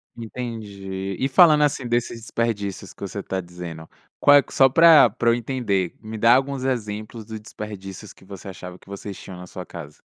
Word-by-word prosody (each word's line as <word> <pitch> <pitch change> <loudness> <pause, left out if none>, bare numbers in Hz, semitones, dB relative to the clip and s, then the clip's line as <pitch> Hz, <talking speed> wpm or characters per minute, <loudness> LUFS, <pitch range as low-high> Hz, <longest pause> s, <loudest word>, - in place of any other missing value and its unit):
Entendi, 100 -5 -6
e 135 - +1
falando, 150 +1 +6
assim, 140 -3 0
desses 120 -1 -1
desperdícios 100 -5 -3
que - - -25
você 100 +1 -4
tá 95 0 -3
dizendo, 85 -2 -8 0.3
qual 145 0 +7
é - - +6
que - - -15
só 135 - +6
pra 160 -1 +7
pra 115 +3 0
eu 115 - +4
entender, 115 -7 -1
me 110 0 -7
dá 115 +2 +5
alguns 135 0 -1
exemplos 110 -3 -3
do 110 0 -7
desperdícios 105 -2 -9
que - - -20
você 95 0 -10
achava 90 -1 -9
que - - -24
vocês 100 0 -7
tinham 95 - -10
na 90 - -9
sua 90 0 -8
casa. 75 -4 -10
105 Hz, 195 wpm, -23 LUFS, 95-120 Hz, 0.3 s, qual